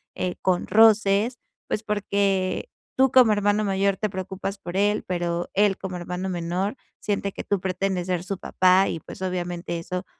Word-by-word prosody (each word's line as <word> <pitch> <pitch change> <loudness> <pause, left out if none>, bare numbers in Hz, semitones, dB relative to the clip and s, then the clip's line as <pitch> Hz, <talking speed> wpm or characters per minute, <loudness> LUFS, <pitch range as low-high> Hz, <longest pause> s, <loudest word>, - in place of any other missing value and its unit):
eh, 180 -1 -2
con 180 -1 +1
roces, 220 +1 +4 0.3
pues 215 - -2
porque 200 - 0 0.3
tú 265 -1 +4
como 245 -4 +6
hermano 205 +1 +1
mayor 195 0 +1
te 215 - -1
preocupas 190 +1 -5
por 175 0 -5
él, 205 +1 +2
pero 175 -1 -2
él 200 -1 +3
como 185 -2 -5
hermano 180 +2 -4
menor 180 +4 -2 0.3
siente 200 -1 -1
que - - -6
tú 200 - 0
pretendes 185 -1 -1
ser 180 -2 -1
su 195 0 -4
papá, 185 +2 +3
y 165 - -3
pues - - -11
obviamente 175 -2 -3
eso 180 +2 -5
190 Hz, 170 wpm, -24 LUFS, 180-205 Hz, 0.3 s, como